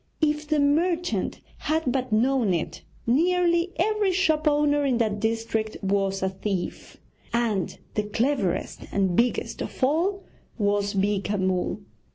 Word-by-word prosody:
If 300 0 +1
the 305 -1 +2
merchant 335 +5 +1 0.2
had 310 -3 0
but 255 -2 -2
known 230 -3 +3
it, 165 - -4 0.2
nearly 340 +6 +2
every 415 +2 +2
shop 320 -4 +2
owner 290 0 +3
in 265 -4 +2
that 215 -3 0
district 220 0 -1
was 195 0 0
a 190 - +2
thief, 190 -1 -4 0.3
and 230 -5 0 0.2
the 210 - +1
cleverest 215 -3 -1
and 190 -3 +1
biggest 240 +3 0
of - - -5
all 350 +9 +1 0.3
was 205 -1 +1
Beeka 200 +1 0
Mull. 185 -1 0
245 Hz, 135 wpm, -25 LUFS, 205-310 Hz, 0.3 s, known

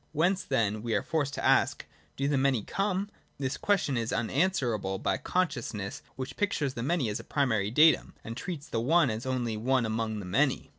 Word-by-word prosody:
Whence, 175 +5 +2
then, 110 -5 0
we 115 -1 -1
are 100 - +1
forced 145 -3 -1
to - - -3
ask, - - +3 0.3
do 140 - 0
the 145 - +1
Many 135 -5 +2
come? 195 - -1 0.3
This 135 0 -2
question 185 -10 +1
is 115 -1 -1
un 115 0 -1
answerable 125 - 0
by - - 0
the - - -18
consciousness 120 - -2
which 130 +1 -6
pictures 155 -10 0
the 115 - -5
Many 140 0 +1
as 105 - -2
a - - -8
primary 110 -8 +1
datum, 155 +7 +4
and 115 - -6
treats 155 +1 -6
the 115 - -1
One 150 +1 +4
as 110 +4 -4
only 120 -4 -1
one 125 +2 +1
among 110 0 -2
the 100 - -6
Many. 130 +9 +1
130 Hz, 205 wpm, -29 LUFS, 110-155 Hz, 0.3 s, datum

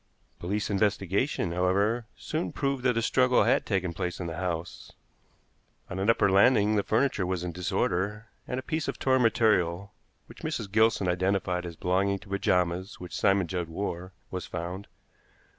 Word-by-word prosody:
Police 105 +4 -2
investigation, 100 - 0
however, 100 +6 +1
soon 155 +2 -3
proved 140 -2 -1
that 125 -2 +3
a 115 - +1
struggle 125 +1 +4
had - - +2
taken 95 -4 0
place 90 -1 -3
in 90 - -4
the 85 -1 -5
house. 85 -2 -4 1.0
On 90 - -4
an 100 +3 +1
upper 115 - +4
landing 105 +2 +4
the 105 - +3
furniture 110 -1 +1
was 90 -2 -2
in 90 - -3
disorder, 95 +3 -1 0.2
and 125 - -2
a - - -7
piece 155 +2 -2
of - - -3
torn 130 -1 +2
material, 100 -5 +2 0.3
which - - -14
Mrs. 100 - -4
Gilson 110 -3 +3
identified 90 0 0
as 85 - -8
belonging 95 +3 +1
to 95 - -16
pajamas 90 0 0
which 90 -1 -8
Simon 95 -1 +3
Judd 85 -1 -3
wore, 90 +1 -4 0.2
was 90 -2 -4
found. 90 +3 -5
95 Hz, 165 wpm, -28 LUFS, 90-110 Hz, 1.0 s, struggle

